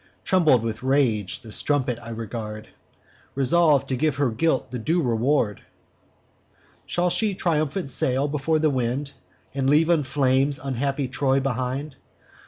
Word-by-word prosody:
Trembling 155 -11 +3
with 115 0 -4
rage, 130 -7 +1
the 110 - -11
strumpet 130 -2 -1
I 115 - -10
regard, 110 -1 -6 0.7
Resolv'd 145 +1 +3
to 130 - 0
give 150 +1 0
her 140 -3 +1
guilt 160 +4 0
the 125 - -4
due 160 +10 0
reward: 120 -4 +1 1.3
'Shall 175 0 0
she 210 0 0
triumphant 155 -2 -1
sail 130 +3 +1
before 150 +2 0
the 155 -1 +2
wind, 130 +2 -2 0.4
And 135 -1 0
leave 160 +4 +4
in 165 -3 +3
flames 135 0 +1
unhappy 135 +1 -2
Troy 135 +2 +1
behind? 130 +2 -3
135 Hz, 140 wpm, -24 LUFS, 125-150 Hz, 1.3 s, leave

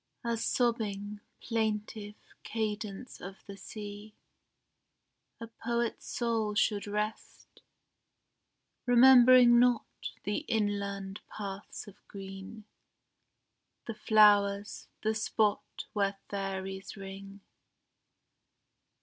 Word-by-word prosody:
As 230 -1 -1
sobbing, 210 -4 -1 0.2
plaintive 215 -2 -2 0.3
cadence 215 +1 -4
of 195 +1 -9
the 200 - -9
sea 205 +1 -9 1.2
A 230 - -6
poet's 235 +1 -3
soul 225 -3 -1
should 210 -1 +1
rest, 210 +1 -5 1.3
remembering 245 -1 +8
not 245 -2 +4 0.4
The 205 - -1
inland 200 -2 -2
paths 200 0 -7
of 205 0 -13
green, 195 +2 -9 1.2
the 230 - -4
flowers, 205 -1 +4 0.2
the 220 0 +2
spot 215 -1 -1
Where 200 -1 0
fairies 195 0 -4
ring. 195 +1 -9
210 Hz, 80 wpm, -31 LUFS, 200-225 Hz, 1.3 s, remembering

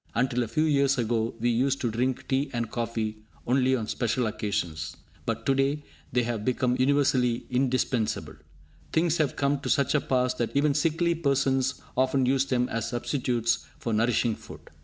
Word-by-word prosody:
Until 125 +1 +1
a 120 - -1
few 135 +8 +1
years 140 -3 +3
ago, 115 -1 0
we 120 +2 +1
used 135 +4 +1
to 120 - 0
drink 125 +3 -1
tea 135 +2 0
and 120 -2 -2
coffee 115 -2 -2 0.3
only 130 +1 +3
on 110 -4 -3
special 120 +2 0
occasions, 100 -7 -3 0.3
but - - -2
to 135 - +3
day 140 +2 +1 0.3
they 125 0 +2
have 115 -3 -2
become 125 +1 +1
universally 130 -3 +2
indispensable. 125 -3 0 0.6
Things 165 0 +2
have 150 -4 +1
come 140 0 +1
to - - -5
such 140 0 +2
a 150 - +3
pass 125 -1 +1
that 120 -1 -3
even 145 0 +3
sickly 165 +3 +1
persons 135 -4 0
often 130 +1 +2
use 135 +1 +2
them 125 -2 +1
as 115 - -2
substitutes 120 -2 -1
for 115 - -3
nourishing 115 0 +2
food! - - -13
125 Hz, 175 wpm, -27 LUFS, 115-140 Hz, 0.6 s, years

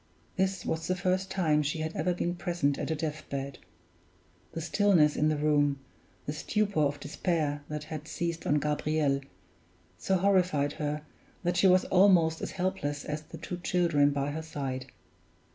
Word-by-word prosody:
This 190 +1 0
was 160 0 -2
the 185 - +1
first 185 +1 0
time 155 -5 +2
she 150 +2 -2
had 160 +1 -3
ever 165 +4 +1
been 175 0 -1
present 175 -5 -1
at - - -3
a 160 - 0
death 155 0 -4
bed; 140 -1 -4 0.9
the - - -3
stillness 165 -2 +3
in 150 - +2
the 155 - 0
room, 145 -1 +2 0.5
the 145 - -3
stupor 205 +3 0
of 145 0 +1
despair 150 0 -1
that 150 0 -4
had 155 0 -7
seized 170 -1 -3
on 145 - +3
Gabriel, 150 -1 0 0.8
so 190 - +1
horrified 180 -7 +2
her, 150 0 -2 0.4
that 175 0 0
she 190 - +5
was 185 0 +5
almost 180 -4 +4
as - - -4
helpless 145 -6 -2
as 150 0 -3
the 160 +1 -11
two 175 +3 -5
children 170 -5 +2
by 140 0 -1
her 160 +2 -4
side. 135 -4 -4
155 Hz, 170 wpm, -29 LUFS, 145-180 Hz, 0.9 s, she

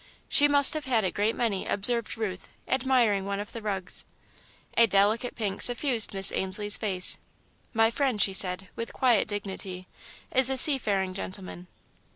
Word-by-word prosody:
"She 290 - +4
must 285 -1 +5
have 310 -3 -5
had 240 -4 0
a 185 - -2
great 210 +5 -2
many," 215 -5 -3
observed 230 +3 -2
Ruth, 195 -5 -6 0.2
admiring 245 -6 0
one 200 0 -4
of 205 - -8
the 230 - -9
rugs. 195 -4 -6 0.7
A 230 - +4
delicate 210 +5 0
pink 205 -4 -5
suffused 245 -2 +5
Miss 195 -1 +2
Ainslie's 205 +2 -2
face. 190 -4 +1 0.5
"My 225 0 +1
friend," 260 -3 -2
she 195 - +2
said, 185 0 +2
with 230 - -7
quiet 245 -5 +1
dignity, 190 -3 -7 0.5
"is 260 0 +5
a 265 - -2
seafaring 205 -10 +2
gentleman." 185 -2 -9
210 Hz, 160 wpm, -25 LUFS, 195-245 Hz, 0.7 s, must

